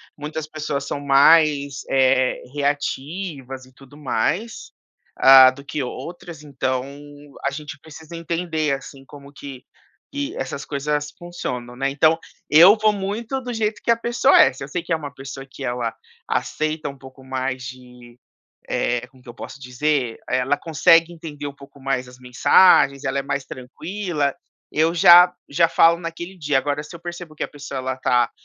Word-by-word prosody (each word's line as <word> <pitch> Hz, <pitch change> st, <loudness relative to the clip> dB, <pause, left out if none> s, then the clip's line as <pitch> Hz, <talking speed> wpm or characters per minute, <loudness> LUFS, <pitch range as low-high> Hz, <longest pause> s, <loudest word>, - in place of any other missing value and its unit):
muitas 150 Hz, +1 st, -6 dB
pessoas 150 Hz, -2 st, -4 dB
são 140 Hz, -, -4 dB
mais, 140 Hz, 0 st, +4 dB
eh, 130 Hz, -1 st, +2 dB
reativas 145 Hz, -1 st, -3 dB
e 130 Hz, -, -21 dB
tudo 135 Hz, +2 st, -17 dB
mais, 150 Hz, -, -2 dB, 0.5 s
hã, 130 Hz, -1 st, +9 dB
do 140 Hz, +2 st, -14 dB
que 145 Hz, -, -4 dB
outras. 165 Hz, +4 st, -8 dB
Então 130 Hz, -3 st, -2 dB, 0.6 s
a 140 Hz, -, +1 dB
gente 145 Hz, -1 st, -8 dB
precisa 160 Hz, +1 st, -12 dB
entender 165 Hz, -3 st, -2 dB
assim 135 Hz, 0 st, -13 dB
como 140 Hz, 0 st, -14 dB
que 135 Hz, -2 st, -10 dB, 0.5 s
que 285 Hz, +7 st, -4 dB
essas -, -, -5 dB
coisas 150 Hz, +1 st, -2 dB
funcionam, 125 Hz, -9 st, -6 dB
né? 135 Hz, +2 st, -1 dB
Então, 155 Hz, +3 st, +3 dB, 0.3 s
eu 175 Hz, +8 st, +8 dB
vou 215 Hz, 0 st, +2 dB
muito 210 Hz, +6 st, -4 dB
do 245 Hz, -1 st, -5 dB
jeito 215 Hz, -1 st, -2 dB
que 235 Hz, -, +2 dB
a -, -, +5 dB
pessoa 240 Hz, +3 st, +2 dB
é. 135 Hz, -, +5 dB
Se 135 Hz, +1 st, -9 dB
eu -, -, -7 dB
sei 175 Hz, +4 st, -3 dB
que 170 Hz, -, -11 dB
é -, -, +4 dB
uma 145 Hz, -3 st, -7 dB
pessoa 135 Hz, 0 st, -9 dB
que 135 Hz, +1 st, -11 dB
ela 120 Hz, -2 st, -2 dB, 0.3 s
aceita 155 Hz, -1 st, -2 dB
um 140 Hz, -, -11 dB
pouco 130 Hz, 0 st, -15 dB
mais 130 Hz, -1 st, -3 dB
de, 125 Hz, -1 st, -12 dB, 0.5 s
eh, 120 Hz, 0 st, -1 dB
como 130 Hz, 0 st, -23 dB
que -, -, -18 dB
eu -, -, -10 dB
posso 130 Hz, -, -9 dB
dizer, 130 Hz, -1 st, -2 dB
ela 135 Hz, +3 st, 0 dB
consegue 165 Hz, +2 st, +3 dB
entender 150 Hz, -3 st, -8 dB
um 140 Hz, -, -7 dB
pouco 140 Hz, 0 st, -16 dB
mais 130 Hz, -2 st, -2 dB
as 125 Hz, 0 st, -15 dB
mensagens, 135 Hz, +3 st, +4 dB
ela 135 Hz, +1 st, -1 dB
é -, -, -1 dB
mais 140 Hz, 0 st, -3 dB
tranquila. 155 Hz, +3 st, -4 dB, 0.4 s
Eu 160 Hz, +2 st, +1 dB
já 175 Hz, +1 st, +8 dB, 0.2 s
já 165 Hz, +3 st, +3 dB
falo 165 Hz, +1 st, +5 dB
naquele 170 Hz, +2 st, -7 dB
dia. 145 Hz, -4 st, 0 dB
Agora 145 Hz, +2 st, -2 dB
se 155 Hz, -, -12 dB
eu 170 Hz, -, -10 dB
percebo 175 Hz, -2 st, -8 dB
que -, -, -7 dB
a -, -, -2 dB
pessoa 145 Hz, -2 st, -7 dB
ela 130 Hz, 0 st, -3 dB
tá 125 Hz, -2 st, +1 dB
145 Hz, 175 wpm, -21 LUFS, 130-165 Hz, 0.6 s, hã